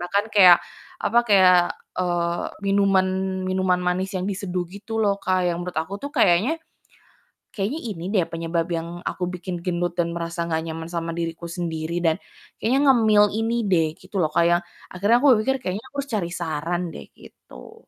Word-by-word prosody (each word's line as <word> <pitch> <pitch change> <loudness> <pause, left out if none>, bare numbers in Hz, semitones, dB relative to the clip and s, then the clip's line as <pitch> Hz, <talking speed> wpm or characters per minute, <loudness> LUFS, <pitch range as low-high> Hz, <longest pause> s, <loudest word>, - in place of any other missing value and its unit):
bahkan 200 +4 0
kayak 185 -4 +8 0.4
apa, 235 - +3
kayak, 185 -3 +6 0.4
eee, 175 -1 -1 0.2
minuman 195 -1 +3 0.4
minuman 185 -1 +1
manis 185 +2 -1
yang 180 - -2
diseduh 185 -2 -3
gitu 220 +3 -4
loh 200 -1 +1
Kak, 185 -1 0
yang 170 - -3
menurut 180 - -5
aku 165 +5 -3
tuh 285 - -4
kayaknya 200 - +3 0.9
kayaknya 220 +10 -3
ini 165 0 -8
deh 190 - +4
penyebab 165 0 -1
yang 170 +1 -4
aku 180 - -3
bikin 180 0 -5
gendut 175 0 -2
dan 170 0 0
merasa 170 0 -3
gak 160 -1 -1
nyaman 160 0 -6
sama 170 0 -4
diriku 165 0 -4
sendiri, 170 -1 -3
dan 165 -2 +2 0.5
kayaknya 255 +5 +2
ngemil 220 -5 +5
ini 225 +1 0
deh 175 -5 +3
gitu 190 +2 -11
loh 155 - +1
Kak, 170 - +3
yang 175 0 +3 0.3
akhirnya 205 +6 +3
aku 270 -1 +6
berpikir 265 +5 +1
kayaknya 190 +4 -3
aku 285 - -15
harus 280 -1 -3
cari 175 -5 -1
saran 170 +1 -2
deh, - - -9
gitu. - - -14
180 Hz, 175 wpm, -23 LUFS, 170-200 Hz, 0.9 s, kayak